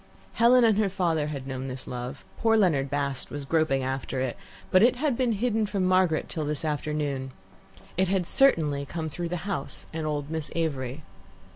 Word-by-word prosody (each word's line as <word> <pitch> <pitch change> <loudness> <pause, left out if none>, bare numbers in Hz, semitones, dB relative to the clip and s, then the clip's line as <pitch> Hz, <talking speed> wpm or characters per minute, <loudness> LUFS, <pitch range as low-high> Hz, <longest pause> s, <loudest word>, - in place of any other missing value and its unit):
Helen 240 +2 +5
and 220 -2 +4
her 210 -2 +2
father 170 -5 0
had 140 -3 -5
known 130 0 -4
this 130 0 -5
love, 125 0 -6
poor 225 -1 +4
Leonard 150 -10 +2
Bast 140 -1 -2
was 145 -1 -5
groping 155 -3 +1
after 130 0 -3
it, 130 -2 -1 0.4
but 185 - +6
it 240 +3 +5
had 280 0 0
been 245 -2 +1
hidden 220 0 0
from 195 -2 0
Margaret 185 -3 +3
till 160 - -3
this 150 +1 -2
afternoon. 145 -3 -2 0.7
It 190 +1 +3
had 185 -1 +1
certainly 160 - +3
come 160 +2 -4
through 170 +3 -4
the 180 - -2
house 185 -9 -4
and 160 -1 -3
old 145 -1 -3
Miss 160 -2 -3
Avery. 145 -4 -2
155 Hz, 185 wpm, -27 LUFS, 140-195 Hz, 0.7 s, but